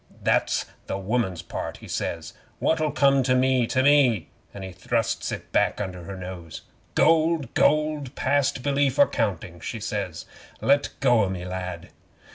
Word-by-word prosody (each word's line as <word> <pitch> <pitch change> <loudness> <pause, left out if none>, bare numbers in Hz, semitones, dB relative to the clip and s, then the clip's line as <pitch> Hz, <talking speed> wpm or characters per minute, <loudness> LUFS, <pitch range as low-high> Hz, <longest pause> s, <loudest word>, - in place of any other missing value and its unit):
'"That's - - +2 0.2
the - - -2
woman's 95 -4 -1
part," - - -5
he - - -12
says. 80 -1 -4 0.2
"What'll 155 -1 +1
come 140 -2 +3
to 130 0 +2
me 130 -2 +3
to 130 +2 +1
me?" 130 - +4 0.2
an' 100 - -8
he 95 - -6
thrusts 90 +1 -1
it - - -7
back - - +2
under 90 -4 -5
her 95 +2 -7
nose. 90 -3 -8 0.3
'"Gold 160 -4 +3
gold, 150 -3 +1
past 140 -3 +1
belief 140 -1 +1
or - - +7
counting," 90 -5 -2
she 110 +6 -5
says. 100 -5 -4 0.3
"Let 140 +1 +3
go 120 -5 +4
o' - - -3
me, 90 -1 -5
lad." 90 0 -5
120 Hz, 160 wpm, -25 LUFS, 95-140 Hz, 0.3 s, or